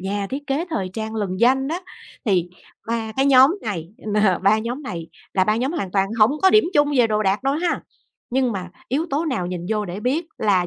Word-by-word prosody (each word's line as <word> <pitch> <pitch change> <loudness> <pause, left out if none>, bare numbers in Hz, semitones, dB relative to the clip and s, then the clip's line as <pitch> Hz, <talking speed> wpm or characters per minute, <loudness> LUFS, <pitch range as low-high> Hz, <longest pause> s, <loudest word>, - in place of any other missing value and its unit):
nhà 200 +1 -2
thiết 285 +2 -5
kế 280 +4 0
thời 195 - -2
trang 220 +2 -4
lừng 195 -4 -3
danh 265 +3 +3
á, 335 +4 -2 0.4
thì 180 -5 +1 0.4
3 225 -1 -2
cái 270 +1 +3
nhóm 270 +5 +6
này 175 -7 -4
nờ 210 -3 +1
3 200 +3 +4
nhóm 240 +6 -4
này 170 - -6 0.3
là 185 - +3
3 215 +2 +2
nhóm 260 +7 -1
hoàn 240 - -3
toàn 195 0 +1
hổng 215 +2 +6
có 380 - +6
điểm 430 +2 +6
chung 290 0 +4
về 240 - +6
đồ 215 -1 0
đạc 195 +3 +1
đâu 270 +1 +1
ha. 340 +3 0 0.5
Nhưng 255 -1 +1
mà 185 -2 -5 0.2
yếu 290 +7 0
tố 295 +4 0
nào 250 - -1
nhìn 175 -1 -5
vô 210 -1 0
để 185 +1 -6
biết 275 +9 0
là 190 -4 +2
220 Hz, 230 wpm, -22 LUFS, 195-270 Hz, 0.5 s, nhóm